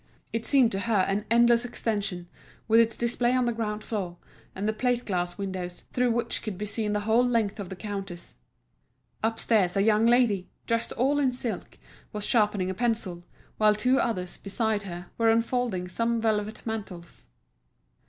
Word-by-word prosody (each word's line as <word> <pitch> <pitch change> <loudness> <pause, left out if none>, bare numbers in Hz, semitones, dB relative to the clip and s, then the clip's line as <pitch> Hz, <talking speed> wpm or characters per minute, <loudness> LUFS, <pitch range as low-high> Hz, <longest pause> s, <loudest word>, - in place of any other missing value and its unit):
It 230 0 -2
seemed 260 -5 +4
to 195 - -2
her 210 -1 +2
an 200 +2 -1
endless 235 +1 +5
extension, 205 -7 -2 0.4
with 225 +1 +5
its 230 -1 +3
display 240 +1 +1
on 255 -1 +2
the 240 - 0
ground 215 -2 -3
floor, 185 -6 -4 0.4
and 200 +2 -2
the 215 - +1
plate 245 +2 0
glass 175 -3 -2
windows, 185 -3 -5
through 250 0 +2
which 235 0 0
could 210 -4 -5
be 210 - -3
seen 210 0 -2
the 210 - 0
whole 220 +3 +3
length 230 -5 0
of 195 -3 -5
the 190 - -6
counters. 195 -2 -6 0.9
Upstairs 220 -4 +1
a 195 - +3
young 220 +1 +4
lady, 235 -6 +3 0.2
dressed 230 0 -1
all 275 +5 +2
in 265 -3 +2
silk, 245 -2 -5 0.4
was 210 -1 -3
sharpening 210 -5 +2
a - - -3
pencil, 215 -5 -1 0.4
while 215 -1 +5
two 250 +5 +2
others, 180 -6 -2
beside 215 +1 -1
her, 175 -2 -8
were 230 0 +4
unfolding 230 -4 +1
some 230 +5 0
velvet 215 -1 -1
mantles. 200 -6 -6
215 Hz, 175 wpm, -27 LUFS, 195-235 Hz, 0.9 s, endless